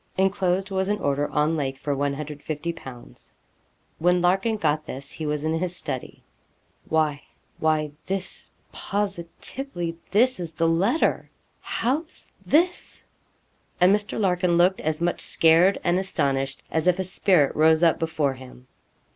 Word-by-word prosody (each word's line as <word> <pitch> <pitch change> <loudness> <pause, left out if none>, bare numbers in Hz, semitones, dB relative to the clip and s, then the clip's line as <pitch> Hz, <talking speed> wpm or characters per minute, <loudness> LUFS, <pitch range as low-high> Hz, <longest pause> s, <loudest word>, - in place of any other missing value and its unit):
Enclosed 190 0 +1
was 190 0 0
an 210 +1 0
order 145 -5 -1
on 150 +2 +1
Lake 135 -3 -2
for 145 0 -2
150_l._ 145 - -5 0.7
When 180 +2 +3
Larkin 195 +5 +2
got 155 -4 0
this 140 +2 -7
he 155 - -5
was 150 0 -2
in 160 +1 0
his 180 0 -3
study. 130 -7 -6 0.7
'Why 155 -2 +1 0.4
why 155 -1 +1 0.2
this 190 -1 -5 0.2
positively 195 0 -4
this 235 +4 +3
is 170 -2 -5
the 165 +1 +1
letter. 195 - +1 0.3
How's 285 +7 -3
this?' 350 +4 0 0.8
And 185 +3 +6
Mr. 210 0 -4
Larkin 180 -3 +2
looked 180 +2 +3
as 155 +1 -2
much 175 0 0
scared 165 +4 +4
and 175 +1 +2
astonished 140 -7 -1
as 160 +1 0
if 180 0 +4
a 190 - -1
spirit 180 -5 +2
rose 160 +1 +4
up 165 -1 +4
before 160 -4 0
him. 130 -1 -13
170 Hz, 140 wpm, -24 LUFS, 150-190 Hz, 0.8 s, And